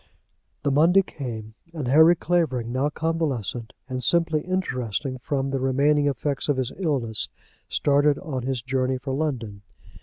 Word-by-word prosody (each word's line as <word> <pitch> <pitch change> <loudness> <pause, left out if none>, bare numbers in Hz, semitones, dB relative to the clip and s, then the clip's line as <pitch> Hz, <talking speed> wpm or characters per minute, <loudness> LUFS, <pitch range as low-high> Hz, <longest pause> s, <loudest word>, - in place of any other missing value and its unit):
The 145 - +1
Monday 170 +7 +5
came, 110 -9 -7 0.2
and 145 -6 -3
Harry 160 +6 +6
Clavering, 155 -10 0
now 130 +4 +1
convalescent 145 -9 -2 0.2
and 130 -1 -4
simply 165 +3 +2
interesting 130 - -2
from 135 +1 -2
the 135 - -1
remaining 145 +3 +2
effects 140 +1 -1
of 145 - +2
his 130 -1 -1
illness, 130 - 0 0.4
started 145 0 +3
on 145 -8 -4
his 125 -1 -3
journey 130 0 0
for 135 +1 -5
London. 125 -9 -3
135 Hz, 145 wpm, -24 LUFS, 125-155 Hz, 0.4 s, Harry